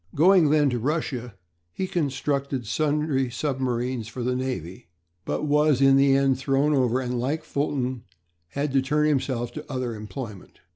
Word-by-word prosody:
Going 175 0 +5
then 145 -2 +3
to 120 - -1
Russia 125 -4 -2 0.4
he 190 - -3
constructed 140 -5 -2
sundry 145 +1 0
submarines 125 -2 -2
for 120 +2 -6
the 125 +1 0
navy; 95 -11 -5 0.4
but - - -2
was 150 -2 +3
in 135 0 +6
the 135 0 +5
end 135 -1 +2
thrown 135 +2 +1
over, 130 -2 +2
and, 125 -1 -2
like 145 +6 -1
Fulton, 130 -5 -2 0.4
had 140 - -3
to 135 - +4
turn 150 +3 +1
himself 130 -5 -1
to 150 -1 -8
other 130 -3 -2
employment. 105 -1 -8
135 Hz, 155 wpm, -25 LUFS, 125-145 Hz, 0.4 s, in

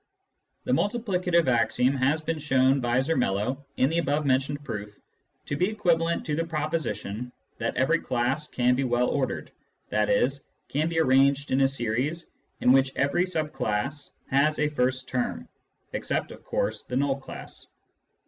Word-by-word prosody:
The - - -2
multiplicative 185 - +1
axiom 125 +2 +2
has 140 +4 +1
been 160 0 -2
shown 135 -2 +3
by 120 -1 +1
Zermelo, 130 -3 0
in 130 - +4
the 165 +4 +1
above 150 -1 0
mentioned 140 +2 +1
proof, 105 -5 -6 0.5
to 145 - -2
be 180 +7 +1
equivalent 170 -5 +1
to 150 - -1
the 165 - 0
proposition 150 -8 -3 0.3
that - - -2
every 160 +6 +3
class 130 +5 -1
can 125 0 +2
be 135 +2 0
well 125 -1 +1
ordered, 135 -3 -2 0.4
i.e. 105 +3 +3 0.4
can 155 +4 0
be 165 -1 0
arranged 140 0 +3
in 130 +1 +3
a 135 - +6
series 135 +6 -2 0.3
in 125 - +5
which 135 0 +3
every 140 +6 +1
sub 160 -4 -2
class 125 +8 -2 0.2
has 150 +3 +3
a 150 0 +1
first 130 -2 0
term 125 -1 -2 0.5
(except, - - -2
of - - -12
course, - - -1
the 125 - -5
null 140 0 +1
class). 135 - -9
140 Hz, 160 wpm, -26 LUFS, 125-155 Hz, 0.5 s, a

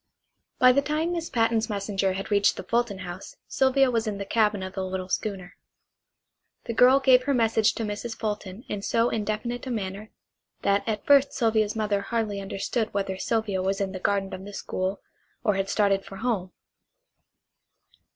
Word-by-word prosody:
By 255 0 +7
the 280 +3 +3
time 305 +4 -1
Miss 335 -1 -3
Patten's 225 -2 +1
messenger 200 -2 -1
had 195 +3 -5
reached 200 0 +3
the - - -5
Fulton 235 -4 0
house 175 +2 -8
Sylvia 265 0 +3
was 230 -1 0
in 205 -2 -2
the 200 - -5
cabin 210 -1 +1
of 190 0 -6
the 190 - -3
little 185 0 -4
schooner. 190 -2 -3 1.1
The 230 - -4
girl 250 +4 +6
gave 255 -2 +5
her 280 -1 +2
message 225 -2 +3
to 230 - -3
Mrs. 215 +2 -4
Fulton 210 -1 -4
in 205 - -4
so 230 +3 +1
indefinite 225 +4 -3
a - - -3
manner 210 -2 -4 0.5
that 200 0 +2
at 215 -2 -2
first 280 -1 +5
Sylvia's 220 -4 +1
mother 210 -2 0
hardly 210 -2 -2
understood 205 +3 -2
whether 195 -1 -2
Sylvia 220 -4 0
was 195 +2 -1
in 195 -1 -1
the 190 - -6
garden 195 0 0
of 185 - -6
the 205 +1 -9
school, 190 0 -3 0.4
or 210 - +3
had 195 0 -2
started 200 -2 +2
for 195 - -10
home. 200 -4 -2
210 Hz, 180 wpm, -26 LUFS, 195-235 Hz, 1.1 s, By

